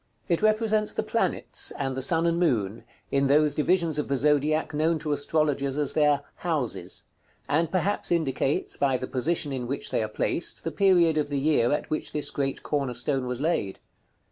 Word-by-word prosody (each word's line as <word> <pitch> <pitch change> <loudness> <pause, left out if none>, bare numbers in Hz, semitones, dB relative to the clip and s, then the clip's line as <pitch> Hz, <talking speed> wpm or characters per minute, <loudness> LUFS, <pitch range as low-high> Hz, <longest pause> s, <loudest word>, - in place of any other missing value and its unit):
It 170 - +1
represents 215 0 +2
the - - -1
planets, - - 0
and 135 -2 -2
the 130 - -3
sun 165 +5 +2
and 170 0 +1
moon, 115 - 0 0.3
in 140 0 +2
those 150 +1 +3
divisions 165 -1 +1
of 150 - -2
the 140 - 0
zodiac 150 +3 +1
known 160 +2 +1
to 155 -1 -4
astrologers 145 -2 0
as 145 -2 0
their 150 -2 +3 0.2
"houses;" 130 - -3 0.4
and 160 +2 +1
perhaps 190 +2 0
indicates, 145 -4 0
by 135 -2 +1
the 130 - -4
position 145 +3 -1
in 125 -2 -4
which 140 +3 -3
they - - +1
are 110 - -1
placed, 135 +9 -2
the 165 - -3
period 175 -5 +3
of 145 - -1
the 140 -1 -1
year 135 -5 +2
at 150 - -2
which 155 - -2
this 150 - +1
great 135 -1 -2
corner 140 -4 -2
stone 130 +1 -1
was 125 -1 -3
laid. 145 - -1
150 Hz, 190 wpm, -26 LUFS, 135-165 Hz, 0.4 s, those